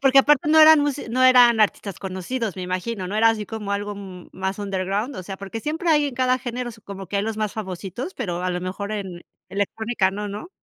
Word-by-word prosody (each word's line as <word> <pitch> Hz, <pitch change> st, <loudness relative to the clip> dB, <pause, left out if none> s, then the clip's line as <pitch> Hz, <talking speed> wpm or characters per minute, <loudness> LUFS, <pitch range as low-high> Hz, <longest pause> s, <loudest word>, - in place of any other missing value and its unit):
Porque 270 Hz, 0 st, +6 dB
aparte 295 Hz, +3 st, +4 dB
no 315 Hz, -, +5 dB
eran 310 Hz, -1 st, +9 dB
mus 290 Hz, -1 st, 0 dB
no 255 Hz, +3 st, 0 dB
eran 245 Hz, -3 st, +7 dB
artistas 200 Hz, -2 st, 0 dB
conocidos, 195 Hz, +3 st, -4 dB
me 185 Hz, -, -5 dB
imagino, 185 Hz, +2 st, -3 dB
¿no?, 205 Hz, -, -3 dB
era 225 Hz, +1 st, +5 dB
así 215 Hz, -2 st, -3 dB
como 210 Hz, -2 st, -5 dB
algo, 205 Hz, +1 st, -2 dB
mm, 190 Hz, -3 st, -10 dB
más 190 Hz, +1 st, -3 dB
under 195 Hz, -2 st, -2 dB
ground. 210 Hz, +8 st, -2 dB
O 185 Hz, -, -5 dB
sea, 195 Hz, +1 st, -7 dB
porque 200 Hz, +3 st, -6 dB
siempre 320 Hz, -, -3 dB
hay 295 Hz, -2 st, +4 dB
en 275 Hz, -, -5 dB
cada 255 Hz, 0 st, +2 dB
género 245 Hz, -1 st, -4 dB
como 195 Hz, -1 st, -8 dB
que 200 Hz, -, -3 dB
hay 200 Hz, -, +1 dB
los 220 Hz, 0 st, -3 dB
más 215 Hz, -2 st, -2 dB
famositos, 200 Hz, -, -6 dB
pero 180 Hz, -7 st, -3 dB
a 185 Hz, -, 0 dB
lo 180 Hz, 0 st, -2 dB
mejor 200 Hz, +3 st, -4 dB
en 190 Hz, -4 st, -5 dB, 0.3 s
electrónica 205 Hz, 0 st, 0 dB
no, 205 Hz, +1 st, -5 dB
¿no? 210 Hz, -, -7 dB
210 Hz, 235 wpm, -23 LUFS, 190-250 Hz, 0.3 s, eran